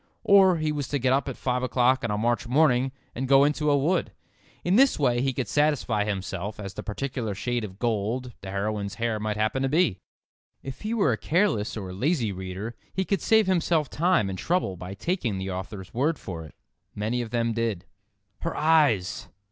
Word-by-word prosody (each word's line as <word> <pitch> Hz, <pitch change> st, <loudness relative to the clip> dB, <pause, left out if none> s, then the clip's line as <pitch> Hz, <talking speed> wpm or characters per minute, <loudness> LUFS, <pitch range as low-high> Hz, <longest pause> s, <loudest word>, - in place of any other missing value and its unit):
Or 190 Hz, -3 st, +6 dB
he 155 Hz, -1 st, 0 dB
was 145 Hz, -3 st, -3 dB
to 145 Hz, -, -1 dB
get 130 Hz, -1 st, +2 dB
up 140 Hz, +1 st, +1 dB
at 130 Hz, -, -6 dB
five 125 Hz, -1 st, -1 dB
o'clock 130 Hz, +1 st, +2 dB
on 115 Hz, -, -1 dB
a 105 Hz, -, 0 dB
March 120 Hz, +2 st, 0 dB
morning 130 Hz, -1 st, +3 dB, 0.2 s
and 130 Hz, +2 st, -3 dB
go 135 Hz, +1 st, +6 dB
into 150 Hz, +1 st, +1 dB
a 145 Hz, -, +4 dB
wood. 165 Hz, +6 st, +1 dB, 0.5 s
In 180 Hz, +2 st, +2 dB
this 270 Hz, +3 st, +5 dB
way 120 Hz, -4 st, +2 dB
he 135 Hz, +1 st, +1 dB
could 130 Hz, -3 st, -3 dB
satisfy 135 Hz, -7 st, +1 dB
himself 100 Hz, 0 st, -4 dB
as 100 Hz, -2 st, -5 dB
to 100 Hz, -, -21 dB
the -, -, -3 dB
particular 115 Hz, -1 st, -3 dB
shade 120 Hz, +3 st, -2 dB
of 95 Hz, -3 st, -7 dB
gold 120 Hz, +2 st, -1 dB
the 95 Hz, -, -7 dB
heroine's 100 Hz, +1 st, -2 dB
hair 115 Hz, -2 st, -1 dB
might 105 Hz, 0 st, -2 dB
happen 110 Hz, +5 st, 0 dB
to 135 Hz, -, +1 dB
be. 145 Hz, -, +2 dB, 0.6 s
If 135 Hz, -1 st, -7 dB
he 220 Hz, +2 st, -2 dB
were 205 Hz, -, +3 dB
a 110 Hz, -, 0 dB
careless 150 Hz, -, +1 dB
or 95 Hz, -3 st, -6 dB
lazy 125 Hz, -, 0 dB
reader 95 Hz, +4 st, -6 dB, 0.2 s
he 190 Hz, -, -1 dB
could 195 Hz, -4 st, 0 dB
save 220 Hz, -1 st, +4 dB
himself 170 Hz, -5 st, +1 dB
time 170 Hz, -, +2 dB
and 95 Hz, -1 st, -4 dB
trouble 175 Hz, -, 0 dB
by 90 Hz, +2 st, -7 dB
taking 130 Hz, -, -2 dB
the 95 Hz, 0 st, -4 dB
author's 95 Hz, +1 st, -7 dB
word 145 Hz, +6 st, +1 dB
for 85 Hz, -4 st, -7 dB
it. 75 Hz, -, -15 dB, 0.4 s
Many 110 Hz, +4 st, -1 dB
of 115 Hz, -, -5 dB
them 115 Hz, 0 st, 0 dB
did. 110 Hz, -5 st, -2 dB, 0.5 s
"Her -, -, -3 dB
eyes!" 145 Hz, -, +2 dB
120 Hz, 205 wpm, -26 LUFS, 105-150 Hz, 0.6 s, Or